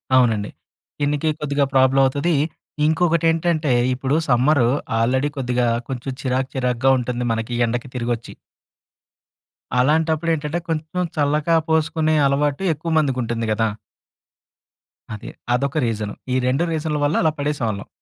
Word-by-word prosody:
అవునండి. 115 -5 +3 0.5
స్కిన్‌కి 145 +2 0
కొద్దిగా 145 -1 0
ప్రోబ్లమ్ 135 +1 +4
అవుతది. 145 +5 +1 0.5
ఇంకొకటేంటంటే, 165 -2 +2 0.2
ఇప్పుడు 135 +3 -1
సమ్మరు 125 +1 +4 0.3
ఆల్రెడీ 130 +5 +1
కొద్దిగా 125 -2 0 0.2
కొంచెం 130 +1 -4
చిరాక్, 130 0 -1
చిరాగ్గా 125 0 +2
ఉంటుంది 125 0 -3
మనకి, 115 +2 -2
ఎండకి 120 +3 -3
తిరిగొచ్చి. 120 -1 -3 1.4
అలాంటప్పుడేంటంటే, 160 +2 +1
కొంచెం 160 +3 -2
చల్లగా 150 +3 +2
పోసుకునే 155 0 +1
అలవాటు 145 +5 0
ఎక్కువ 160 +3 -5
మందికుంటుంది 120 -5 -1
కదా! 110 +1 +1 1.5
అదే. 105 - -7 0.2
అదొక 140 +4 0
రీజను. 105 -2 -2 0.2
ఈ - - +1
2 135 +7 +1
రీజన్ల 155 -1 -1
వల్ల 150 - +1
అలా 160 - +3
పడేసేవాళ్ళం. 120 -9 -2
140 Hz, 115 wpm, -21 LUFS, 125-155 Hz, 1.5 s, ప్రోబ్లమ్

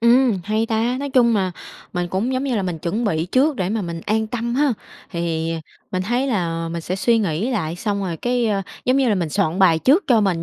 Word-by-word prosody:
Ừm, 235 -2 +4
hay 215 +2 0
ta! 230 +3 0
Nói 280 -1 -3
chung 240 -3 +4
là 190 -2 +1 0.4
mình 175 0 -2
cũng, 205 +9 -1
giống 260 +2 -1
như 255 -4 0
là, 200 - 0
mình 175 -3 -3
chuẩn 205 +9 -2
bị 165 -5 0
trước 265 - +2
để 185 -1 -1
mà 215 0 -1
mình 170 -1 -5
an 220 +1 +1
tâm 235 +1 -3
ha, 285 -1 +3 0.4
thì 165 -2 -2 0.4
mình 185 0 -1
thấy 245 +6 0
là 165 -8 -1
mình 170 0 -4
sẽ 185 +3 -3
suy 230 +3 +3
nghĩ 195 +4 0
lại 170 -9 -2
xong 200 +2 -2
rồi, 170 -3 -3
cái, 245 +2 0
ờ, 200 -2 0 0.2
giống 255 +2 +3
như 265 -3 +3
là, 210 - +3
mình 175 -5 -1
soạn 185 +1 0
bài 170 -4 +5
trước 295 - +4
cho 235 -4 +4
mình 180 -5 +1
210 Hz, 250 wpm, -21 LUFS, 175-240 Hz, 0.4 s, bài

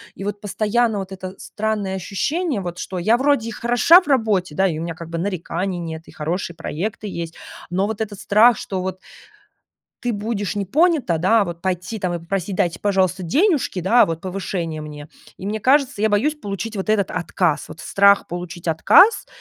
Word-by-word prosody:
и 195 - -8
вот 205 0 -4
постоянно 215 +1 0
вот 195 0 -6
это 185 -1 -7
странное 210 -3 -2
ощущение, 270 - -2
вот 175 -1 -6
что 185 -2 -4
я 220 +7 +3
вроде 270 -4 +1
и - - -5
хороша 245 +10 +5
в - - -16
работе, 215 - +1
да, 190 +3 +3
и 160 -3 -2
у - - -3
меня 170 -1 -4
как 170 -1 -9
бы 165 - -4
нареканий 180 0 -3
нет, 165 -1 -6
и - - -13
хорошие 170 +3 -3
проекты 205 +7 -4
есть, 170 -3 -5 0.4
но 190 +3 +1
вот 220 -1 -4
этот 205 -2 -4
страх, 215 +2 +5
что 190 -2 -4
вот 185 0 -4 1.0
ты 245 -1 0
будешь 205 -1 -3
не 200 - -1
понята, 280 - +2
да, 205 +6 +4
а - - 0
вот 170 -2 -7
пойти 185 +4 -2
там 180 -2 -2
и 170 - -2
попросить: 185 +2 -3
"Дайте, 175 -1 0
пожалуйста, 190 -2 +1
денежки, 290 - +1
да, 225 +8 +5
вот 165 0 -4
повышение 180 -4 -4
мне". 150 -1 -9 0.3
И 190 - -8
мне 215 +1 -2
кажется, 270 -2 +2
я 220 - +4
боюсь 230 +9 +2
получить 210 -4 -5
вот 195 +2 -4
этот 210 -3 +2
отказ, 165 -3 -1
вот 160 - -10
страх 200 +3 +4
получить 175 0 -7
отказ, 355 - +5
195 Hz, 200 wpm, -21 LUFS, 175-220 Hz, 1.0 s, хороша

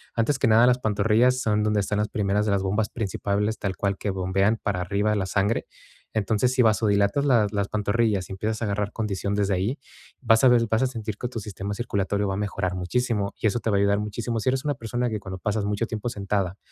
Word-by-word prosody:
Antes 125 +4 +1
que - - +2
nada, 115 +2 +6
las 125 0 +3
pantorrillas 115 +3 +2
son 105 -2 +1
donde 105 0 +1
están 105 +1 -1
las 105 0 0
primeras 105 0 0
de 105 - +1
las 100 -1 +1
bombas 105 +2 0
principales, 105 0 -2
tal 95 -2 -2
cual, 100 -1 -1
que 105 - -3
bombean 95 +3 +1
para 100 -5 -2
arriba 100 +3 0
la 100 -2 0
sangre, 100 +4 0 0.5
entonces, 110 +4 +1
si 130 - +3
vasodilatas 105 +2 +2
las 115 -7 +3
las 100 -2 -1
pantorrillas 105 -2 0
y - - -9
empiezas 110 +3 -3
a - - 0
agarrar 105 0 -2
condición 100 -2 -2
desde 100 -1 +1
ahí, 100 +9 -1 0.4
vas 115 0 +4
a - - +9
ver 120 -2 +5
vas 110 +1 +2
a - - +3
sentir 110 -4 -5
que 125 - -3
tu 120 -2 -5
sistema 100 -1 -5
circulatorio 100 -3 -1
va 95 - -1
a - - -4
mejorar 100 -2 -2
muchísimo 100 +2 -1
y - - +1
eso 115 +3 0
te 115 - -2
va 105 - +2
a - - +3
ayudar 100 0 +2
muchísimo. 115 +3 -3
Si 110 - -5
eres 130 0 0
una 145 -1 -1
persona 120 +1 -2
que 110 -2 -3
cuando 95 -2 -7
pasas 105 +1 -1
mucho 105 +2 -1
tiempo 110 +1 -4
sentada 100 -4 -2
105 Hz, 235 wpm, -25 LUFS, 100-115 Hz, 0.5 s, a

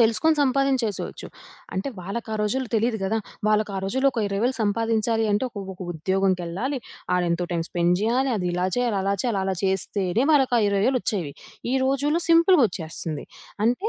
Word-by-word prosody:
తెలుసుకొని 235 +8 +4
సంపాదించేసేవచ్చు. 260 -6 0 0.5
అంటే 190 +7 -2
వాళ్ళకా 215 +5 -5
రోజుల్లో 250 +4 -1
తెలీదు 225 +1 +1
గదా! 220 +4 0 0.3
వాళ్ళకా 215 -2 +1
రోజుల్లో 265 +8 +2
ఒక 235 - -1
20,000 220 +6 0
సంపాదించాలి 225 +1 +1
అంటే 205 +5 +1
ఒక 205 -4 -6
ఒక 180 - -24
ఉద్యోగం‌కెళ్ళాలి. 190 - -1 0.4
ఆడెంతో 175 -1 0
టైమ్ 165 -1 -1
స్పెండ్ 175 0 +2
జేయాలి. 250 +5 +1
అదిలా 180 -1 -1
చేయాలి, 245 -4 +1
అలా 200 +1 +1
చేయాలి, 230 -6 0
అలా 190 0 0
చేస్తేనే 190 +3 0
వాళ్ళకి 270 -4 +3
ఆ - - +3
ఇరవై 200 -1 +1
వేలొచ్చేవి. 205 - -1 0.4
ఈ - - +2
రోజుల్లో 285 +5 +1
సింపులగొచ్చేస్తంది. 230 - +2 0.4
అంటే 245 - +1
215 Hz, 145 wpm, -24 LUFS, 190-255 Hz, 0.5 s, తెలుసుకొని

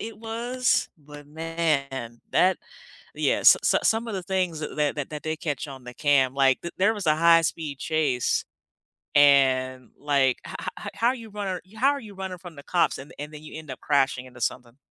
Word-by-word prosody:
it 220 -1 -7
was, 240 +3 0
but 145 -1 -13
man, 145 -6 -2
that 185 +1 +3 0.6
yeah, - - +1
so - - +9
so - - +3
some 225 +1 +1
of 220 - -4
the 190 - -3
things 180 -3 -1
that 150 - -6
that 150 -1 +1
that 145 -2 -4
that 150 -1 -6
they 155 0 -2
catch 150 -2 -3
on 135 -2 -10
the 125 0 -9
cam, 135 -3 +2
like, 135 -1 +3
the 170 - -5
there 200 +4 +3
was 205 -5 -5
a 155 0 +4
high-speed 165 -3 +3
chase 145 -6 0 0.7
and, 130 -3 +4
like, 140 -3 +2
"Ho - - -8 0.2
ho - - -8
how 230 - +2
are 255 - -1
you 230 -3 -10
runnir 200 -3 -3 0.2
how 255 +5 +3
are 285 - -3
you 210 -5 -12
running 190 -1 -5
from 175 -2 -11
the 140 - -11
cops 175 +2 +1
and 135 +2 -11
and 150 +1 -6
then 150 0 -10
you 155 - -9
end 160 -2 -10
up 130 - -7
crashing 135 -3 +1
into 120 -2 -14
something?" 120 +1 -3
155 Hz, 210 wpm, -25 LUFS, 135-185 Hz, 0.7 s, so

